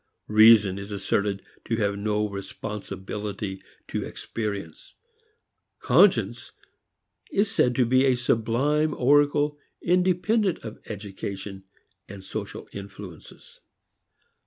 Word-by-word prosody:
Reason 105 -3 +7
is 100 +1 -8
asserted 100 0 -1 0.2
to 115 - 0
have 100 -2 0
no 105 +1 0
responsibility 100 0 -6 0.3
to - - -2
experience; 105 -3 -6 0.8
conscience - - +3 0.8
is 200 0 +1
said 125 0 +2
to 125 - +3
be 130 +3 +4
a 130 -2 +4
sublime 125 +6 +1
oracle 145 +2 +3 0.2
independent 185 +3 +2
of 110 - -8
education 100 -1 -7 0.4
and 100 -2 -9
social 95 - -6
influences. 100 -4 -11
105 Hz, 95 wpm, -25 LUFS, 100-135 Hz, 0.8 s, Reason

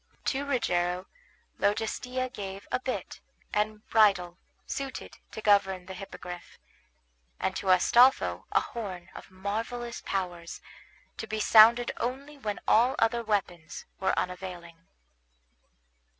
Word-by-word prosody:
To 275 +1 0
Rogero 180 -10 0 0.5
Logestilla 250 +5 -1
gave 195 -1 -7
a - - +1
bit 255 0 -5 0.3
and 210 0 -1
bridle 195 -5 +3 0.3
suited 275 -1 -6
to 220 - -7
govern 195 -3 +3
the 190 - -8
Hippogriff; 180 -2 -9 0.8
and - - -1
to - - -5
Astolpho 240 +8 +4
a - - +4
horn 185 -6 -7
of - - -11
marvellous 225 +5 -4
powers, 175 -3 -4 0.6
to 220 - -5
be 215 0 -3
sounded 230 +3 +7
only 275 +5 -4
when 215 -7 -4
all 240 +4 +4
other 235 +1 +2
weapons 180 -7 -2
were 190 - +1
unavailing. 175 -2 -5
205 Hz, 115 wpm, -28 LUFS, 180-235 Hz, 0.8 s, sounded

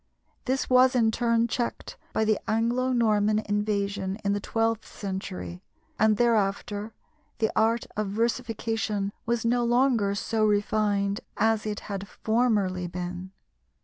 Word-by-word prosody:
This 265 +1 0
was 255 0 +5
in 225 -3 +4
turn 230 0 +2
checked 235 +1 -3 0.2
by 220 - +1
the 215 -1 +2
Anglo 235 +4 +1
Norman 215 -3 +3
invasion 205 -2 -1
in 200 - +2
the 205 - 0
twelfth 225 +1 -1
century, 90 - -5 0.4
and 215 -1 +4
thereafter 210 -2 0 0.4
the 220 - +1
art 225 +2 +2
of 215 -1 -1
versification 225 -2 -1
was 235 -1 0
no 240 +1 +2
longer 240 -4 +2
so 220 +2 -1
refined 205 -1 +1 0.2
as 220 0 +2
it 210 -1 -3
had 200 -1 -5
formerly 205 -5 0
been. 180 +1 -5
215 Hz, 130 wpm, -27 LUFS, 200-230 Hz, 0.4 s, was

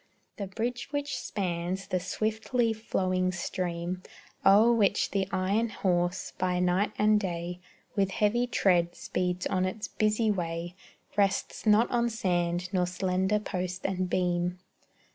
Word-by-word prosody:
The 200 - -4
bridge 240 +5 -3
which 285 -1 -2
spans 185 -1 -3
the 185 -1 -1
swiftly 220 +5 0
flowing 185 -4 0
stream 180 0 -3 0.4
O'er 215 +5 +7
which 210 -4 +2
the 195 -2 0
iron 195 +5 +1
horse, 175 -3 0
by 180 -1 +1
night 180 +4 +2
and 210 0 +4
day, 175 -2 -4 0.4
With 195 -2 +2
heavy 215 +5 +1
tread 175 -7 +2
speeds 180 0 -2
on 185 -1 +1
its 190 +4 -2
busy 215 0 +1
way, 170 -2 -3 0.4
Rests 200 +2 0
not 215 +3 +6
on 235 -1 +2
sand, 175 -5 0
nor 180 -1 +2
slender 190 +2 +1
post 185 -3 -4
and 185 -1 -1
beam. 180 0 0
185 Hz, 135 wpm, -29 LUFS, 180-215 Hz, 0.4 s, O'er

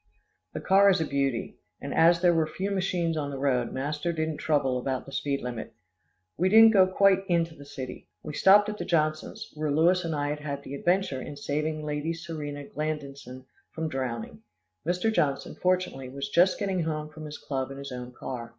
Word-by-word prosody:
The - - -3
car 200 +1 +5
is 190 - +3
a 160 - 0
beauty, 140 -4 -1 0.2
and - - -5
as 170 +1 +5
there 175 -1 +5
were 160 -1 +2
few 190 +5 -3
machines 180 -4 0
on 145 -2 -2
the 140 - -5
road, 130 -3 0
master 150 +5 -2
didn't 160 -2 -2
trouble 135 -5 +1
about 130 0 -3
the 135 - -11
speed 140 0 -2
limit. 115 -2 -6 0.6
We 185 +2 +2
didn't 225 +2 +8
go 190 -3 +6
quite 195 0 +4
into 170 -2 +1
the 145 -2 -13
city. 135 -3 -8 0.2
We 150 - -6
stopped 205 +6 +6
at 210 0 -5
the - - -2
Johnsons', 155 -2 -1
where 155 0 -2
Louis 170 +5 +3
and 165 -2 -2
I 145 0 -1
had 150 0 -3
had 140 -1 -5
the 135 - -8
adventure 175 -2 0
in 145 - -7
saving 155 +2 -2
Lady 150 +2 -2
Serena 155 -4 -6
Glandison 140 -4 -5 0.2
from 160 -1 -4
drowning. 120 -6 -4 0.5
Mr. 180 +6 +1
Johnson, 140 -8 0
fortunately, 180 -8 -1
was 140 +1 -5
just 180 +2 +4
getting 195 -3 -1
home 155 -1 -2
from 155 0 -10
his 150 0 -7
club 135 -2 -3
in 135 - -8
his 140 0 -7
own 125 0 -6
car. 120 -1 -6
155 Hz, 200 wpm, -27 LUFS, 140-175 Hz, 0.6 s, didn't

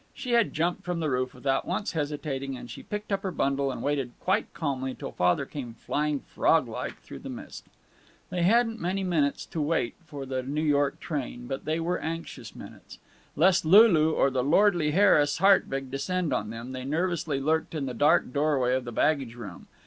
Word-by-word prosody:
She 260 -3 -5
had 235 -2 +3
jumped 170 +2 -1
from 180 -1 -2
the 155 -3 -1
roof 130 0 -1
without 135 -1 -1
once 210 - -2
hesitating, 145 -4 -3
and 120 -1 -9
she - - -8
picked 210 0 -6
up 195 -1 0
her 195 - -2
bundle 140 -4 0
and 125 - -6
waited 140 -4 -1
quite 190 +4 0
calmly 130 -4 -3
till - - -7
Father 90 +10 +1
came 125 -5 -7
flying 150 +4 -1
frog - - +2
like - - -5
through - - -10
the - - -8
mist. - - -9 0.6
They 180 - -1
hadn't 225 +4 +3
many 190 +3 -1
minutes 155 -6 0
to 160 - -4
wait 150 -5 0
for 145 -3 -7
the 130 -1 -2
New 145 +4 -2
York 145 -2 +1
train, 130 -6 -4
but 135 +2 -5
they 155 +2 0
were 175 +2 -1
anxious 160 -8 -6
minutes. - - -12 0.4
Lest 180 +4 +4
Lulu 165 -3 +6
or 135 - +2
the 130 -1 0
lordly 170 +1 +3
Harris 150 -5 +4
Hartwig 135 -8 +3
descend 170 +3 -1
on 105 -4 -1
them, 115 +3 -7
they 130 -1 -5
nervously 160 0 -1
lurked 160 +3 0
in 145 -3 -2
the 130 - -4
dark 145 +1 +3
doorway 140 -4 +2
of 130 -1 -1
the 120 - -5
baggage 135 -1 +1
room. 105 -7 -9
145 Hz, 195 wpm, -27 LUFS, 135-175 Hz, 0.6 s, Lulu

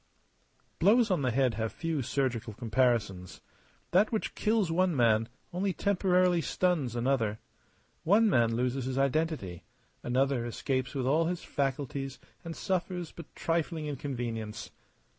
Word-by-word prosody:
Blows 215 +4 +4
on 180 - +2
the 130 - +1
head 125 0 +2
have 110 +1 -2
few 165 -4 -2
surgical 125 -3 -1
comparisons. 110 -6 0 0.5
That 190 +5 +4
which 220 - -2
kills 210 -5 +1
one 180 0 +2
man 115 -3 +3 0.2
only 190 +2 0
temporarily 185 -2 +2
stuns 160 -10 0
another. 120 -4 +1 0.7
One 205 +7 +5
man 115 - +3
loses 125 +2 -1
his 130 0 -3
identity; 140 - 0 0.4
another 130 0 +1
escapes 130 +2 -2
with 130 -2 -1
all 155 +5 +3
his 175 +1 -2
faculties 135 -1 -2 0.3
and 165 -1 -6
suffers 180 -2 -2
but 170 - -10
trifling 165 -1 -1
inconvenience. 120 -6 -4
135 Hz, 130 wpm, -30 LUFS, 120-175 Hz, 0.7 s, One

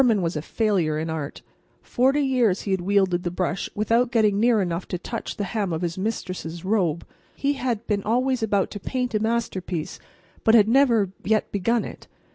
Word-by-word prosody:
Behrman 220 -7 +3
was 165 0 -1
a 150 - -2
failure 180 -5 0
in 160 +1 -3
art. 155 -3 -5 0.4
Forty 270 +4 +2
years 245 -8 +2
he 200 - -4
had 190 -1 +1
wielded 190 -2 +2
the 175 - -2
brush 180 +1 -2
without 230 +3 +2
getting 210 -3 +3
near 230 0 +4
enough 175 -2 -2
to 180 - -3
touch 230 +6 -6
the 205 - -1
hem 200 -1 -2
of 160 +2 -2
his 170 -1 -2
Mistress's 185 -4 -4
robe. 185 -6 0 0.3
He 280 +1 0
had 245 -5 -2
been 205 -2 0
always 250 +4 +1
about 205 -3 +1
to 205 - -6
paint 250 +3 -2
a 215 - +2
masterpiece, 195 -7 -2 0.4
but 225 - +5
had 215 -2 +6
never 230 -6 +3
yet 215 +1 +1
begun 225 +4 +1
it. - - -10
205 Hz, 195 wpm, -24 LUFS, 180-230 Hz, 0.4 s, had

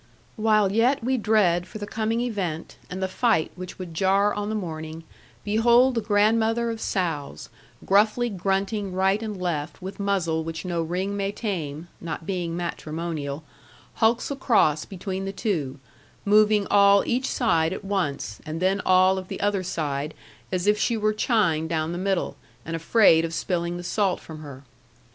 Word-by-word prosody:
While 215 -3 +3
yet 240 +5 +2
we 260 +2 +1
dread 195 -6 +2
for 215 - -8
the 205 - -5
coming 225 +2 -1
event, 190 -10 -3
and 185 +1 -4
the - - +1
fight 190 -3 +1
which 185 0 -8
would 180 -3 -7
jar 195 +4 +2
on 205 0 -3
the 220 - -2
morning, 160 -4 -5 0.4
behold 235 +5 +4
the 230 - 0
grandmother 225 +2 +2
of 225 -1 -6
sows, 165 -7 -3 0.4
gruffly 215 +5 +3
grunting 195 0 -1
right 190 +3 +2
and 210 -4 -5
left 165 -5 -3
with 190 +2 -8
muzzle 180 -5 0
which 165 +2 -6
no 170 -2 -1
ring 185 +5 -2
may 200 0 -1
tame 170 -8 -4
(not 165 -1 -6
being 175 -3 -2
matrimonial), 160 -3 -4 0.5
hulks 230 +5 +1
across 215 - +2
between 190 0 -5
the 195 - -3
two, 155 - -2 0.5
moving 210 0 +4
all 200 0 +6
each 255 +2 0
side 160 -1 +2
at 190 - -6
once, 150 - -2
and 155 +1 -5
then 190 +3 +1
all 185 +1 +4
of 185 - -9
the - - -6
other 205 -1 +1
side 150 -4 -3 0.4
as 180 -1 -1
if 210 0 +3
she 235 +1 +1
were 215 0 +1
chined 185 -9 +1
down 160 -1 -1
the 175 - -4
middle, 190 -1 -1 0.3
and 165 - -4
afraid 165 -1 +4
of 165 0 -3
spilling 175 -1 -2
the 175 - -7
salt 195 0 0
from 160 -1 -10
her. 140 -3 -10
190 Hz, 170 wpm, -25 LUFS, 165-210 Hz, 0.5 s, all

